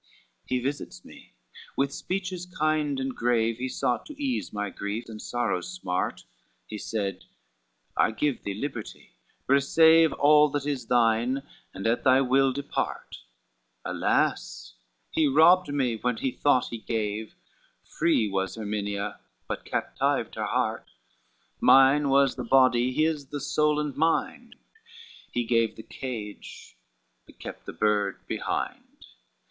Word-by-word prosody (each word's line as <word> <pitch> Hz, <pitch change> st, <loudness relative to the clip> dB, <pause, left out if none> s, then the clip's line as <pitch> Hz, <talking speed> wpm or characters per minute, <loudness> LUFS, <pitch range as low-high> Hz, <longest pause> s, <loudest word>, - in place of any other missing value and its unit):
XCV -, -, -33 dB
"He 130 Hz, -, 0 dB
visits 135 Hz, -, -5 dB
me, -, -, -16 dB, 0.4 s
with 140 Hz, 0 st, +1 dB
speeches 185 Hz, -1 st, -4 dB
kind 155 Hz, -4 st, 0 dB
and 130 Hz, -1 st, -3 dB
grave 115 Hz, -1 st, +1 dB
He 130 Hz, +1 st, -3 dB
sought 125 Hz, -1 st, -1 dB
to 300 Hz, -2 st, -11 dB
ease 270 Hz, -3 st, -2 dB
my 105 Hz, -1 st, -3 dB
grief, 100 Hz, +3 st, -4 dB
and 110 Hz, -1 st, -9 dB
sorrows' 120 Hz, +9 st, -2 dB
smart. 90 Hz, -, -3 dB, 0.4 s
He 105 Hz, -, -7 dB
said, 100 Hz, -3 st, -3 dB, 0.7 s
'I -, -, +3 dB
give 135 Hz, +3 st, -1 dB
thee 100 Hz, -, -4 dB
liberty, 115 Hz, -, -6 dB, 0.3 s
receive 160 Hz, +4 st, +5 dB
All 150 Hz, +1 st, +5 dB
that 145 Hz, -1 st, -2 dB
is 135 Hz, -5 st, -3 dB
thine, 120 Hz, +2 st, +2 dB, 0.3 s
and 95 Hz, -, -8 dB
at 115 Hz, +1 st, +1 dB
thy 130 Hz, -1 st, +5 dB
will 135 Hz, 0 st, +3 dB
depart:' 140 Hz, +2 st, -4 dB, 0.7 s
Alas, -, -, -1 dB, 0.4 s
he 160 Hz, -2 st, +2 dB
robbed 160 Hz, +4 st, +5 dB
me 130 Hz, -5 st, 0 dB
when 125 Hz, +1 st, -1 dB
he 130 Hz, -, -1 dB
thought 130 Hz, -1 st, +2 dB
he 115 Hz, -, -6 dB
gave, 110 Hz, -1 st, -3 dB, 0.5 s
Free 160 Hz, -9 st, +1 dB
was 95 Hz, 0 st, -2 dB
Erminia, 105 Hz, -2 st, -3 dB, 0.3 s
but -, -, -5 dB
captived -, -, -1 dB
her -, -, -3 dB
heart, -, -, -1 dB, 0.7 s
Mine 135 Hz, +2 st, +6 dB
was 135 Hz, -1 st, +3 dB
the 125 Hz, -, -3 dB
body, 130 Hz, 0 st, +4 dB
his 155 Hz, 0 st, 0 dB
the 145 Hz, -, -5 dB
soul 150 Hz, +2 st, +1 dB
and 150 Hz, -2 st, -3 dB
mind, 225 Hz, +10 st, -1 dB, 0.8 s
He 120 Hz, -, -1 dB
gave 115 Hz, -1 st, +1 dB
the 110 Hz, -, -10 dB
cage 110 Hz, -6 st, -8 dB, 0.5 s
but -, -, -18 dB
kept -, -, -9 dB
the -, -, -4 dB
bird 105 Hz, +2 st, 0 dB
behind. -, -, -4 dB
130 Hz, 140 wpm, -27 LUFS, 110-145 Hz, 0.8 s, Mine